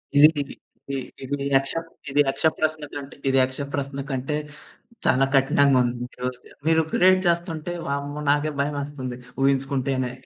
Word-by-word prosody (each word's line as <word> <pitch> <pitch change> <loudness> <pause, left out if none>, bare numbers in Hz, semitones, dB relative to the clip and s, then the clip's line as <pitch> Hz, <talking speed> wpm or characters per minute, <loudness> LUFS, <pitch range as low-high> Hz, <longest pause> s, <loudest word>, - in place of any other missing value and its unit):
ఇది, 145 +1 +10
ఇది, 140 - -6 0.4
ఇది, - - 0 0.3
ఇది 140 +2 -2 0.2
యక్ష 135 0 +2 0.4
ఇది 145 +2 +4
యక్ష 135 +3 -1
ప్రశ్నకంట్ 150 -3 -3 0.2
ఇది 135 0 +3
యక్ష 130 +2 -3
ప్రశ్న 140 0 -3
కంటే, 135 +2 -2 0.7
చాలా 135 +1 +4
కఠినంగా 135 -1 +4
ఉంది. 120 0 -1 0.2
ఈరోజు 125 0 -3
ద - - -16
మీరు 160 0 +5
క్రియేట్ 185 +1 +5
చేస్తుంటే 170 -1 -1
వామ్మో! 140 +1 -3
నాకే 150 +1 +2
భయమేస్తుంది. 140 -3 -3 0.3
ఊహించుకుంటేనే 135 -1 +1
140 Hz, 140 wpm, -24 LUFS, 135-150 Hz, 0.7 s, ఇది